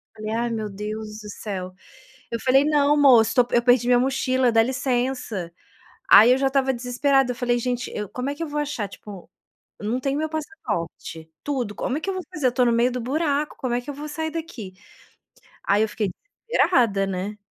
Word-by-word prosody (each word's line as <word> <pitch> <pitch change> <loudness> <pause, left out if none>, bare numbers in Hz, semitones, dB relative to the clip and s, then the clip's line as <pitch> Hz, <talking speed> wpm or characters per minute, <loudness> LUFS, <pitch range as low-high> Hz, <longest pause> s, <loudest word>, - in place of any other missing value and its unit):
Falei: 215 0 -5
"Ai 235 +2 -1
meu 220 -2 -3
Deus 210 +1 -6
do 210 - -9
céu". 190 -3 -6 0.6
Eu 230 - -3
falei: 270 +3 +4
"Não 295 -1 +3
moço 240 -6 +5
tô 250 - +5
pe 240 - -1
eu 240 - +3
perdi 245 0 +4
minha 245 - +5
mochila 255 -1 +1
dá 225 0 +5
licença". 245 -7 -2 0.6
Aí 225 +4 +9
eu 255 - +4
já 270 0 +1
estava 265 0 +1
desesperada, 250 +2 +1
eu - - -5
falei: 240 0 0
"Gente, 245 +1 -2
eu 210 -2 -4
como 250 +2 -4
é 285 - -3
que 330 - -4
eu - - -4
vou 295 0 -2
achar, 290 -8 -3
tipo, 195 -2 -12 0.5
eu 210 - -5
não 245 +3 0
tenho 275 +1 -1
o - - -1
meu 315 0 -2
passaporte, 210 - -5
tudo, 255 -8 -2
como 260 - -2
é - - -5
que 390 - -3
eu - - -1
vou 370 -1 -4
fazer, 305 -7 +1
eu - - +2
tô 250 0 +3
no 240 - +3
meio 235 +2 +2
do 250 - -3
buraco 290 +3 -1
como 255 -2 -3
é 245 - 0
que 255 - -11
eu - - -3
vou 295 +2 -7
sair 315 +2 -3
daqui?". 305 - -7 0.9
Aí 200 +2 +2
eu 220 - -1
fiquei 210 -2 -2 0.4
desesperada, 240 - +2
né. 195 +2 -4
245 Hz, 225 wpm, -23 LUFS, 215-280 Hz, 0.9 s, Aí